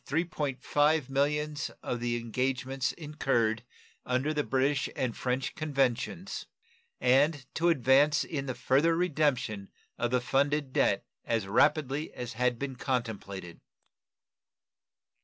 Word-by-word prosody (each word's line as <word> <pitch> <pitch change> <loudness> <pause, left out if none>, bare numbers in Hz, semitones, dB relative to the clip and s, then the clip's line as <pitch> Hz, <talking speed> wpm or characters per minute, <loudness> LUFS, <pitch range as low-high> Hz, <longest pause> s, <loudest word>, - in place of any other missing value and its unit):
5 150 -1 +2
millions 150 +2 0
of 120 - -2
the 120 0 -1
engagements 130 +3 -1
incurred 135 -8 0 0.4
under 130 +5 0
the 150 -1 0
British 135 0 +1
and 125 -3 -1
French 130 +1 -2
conventions, 140 +4 -1 0.5
and 135 +2 +3
to 170 +2 +2
advance 140 0 +4
in 140 -4 -4
the 130 - -3
further 140 +6 +3
redemption 140 - 0 0.3
of 120 - +1
the 125 +1 +2
funded 140 +2 0
debt - - +2 0.2
as 115 -3 0
rapidly 140 +8 +2
as 125 -1 -5
had 125 +1 +1
been 135 +1 -4
contemplated. 105 -9 -4
135 Hz, 115 wpm, -30 LUFS, 125-150 Hz, 0.5 s, advance